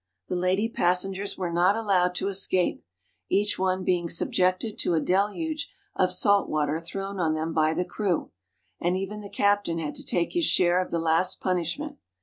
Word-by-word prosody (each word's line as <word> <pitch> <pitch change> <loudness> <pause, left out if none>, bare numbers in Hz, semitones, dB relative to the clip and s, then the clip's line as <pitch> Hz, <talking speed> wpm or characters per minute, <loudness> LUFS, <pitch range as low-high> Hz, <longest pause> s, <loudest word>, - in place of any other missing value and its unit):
The - - -1
lady 185 +4 +1
passengers 195 -1 0
were 180 -2 -2
not 180 +4 +4
allowed 185 -5 +1
to 190 - -1
escape, 190 -2 0 0.5
each 205 0 +1
one 185 0 0
being 175 -2 0
subjected 185 +5 0
to 170 - +1
a - - +3
deluge 210 - -1 0.2
of 185 -1 +2
salt 200 +2 +3
water 150 0 0
thrown 195 +3 -5
on 160 -2 +1
them 160 +1 -2
by 155 0 +2
the 180 +2 0
crew, 190 -5 -2 0.5
and 175 +2 +1
even 200 +2 -4
the 200 - -9
captain 205 -5 +1
had 155 -3 -3
to - - -9
take 170 -1 -1
his 345 -2 +2
share 180 -5 +3
of 185 - -5
the 170 - -1
last 165 +3 +1
punishment. 185 - -2
185 Hz, 180 wpm, -26 LUFS, 170-200 Hz, 0.5 s, not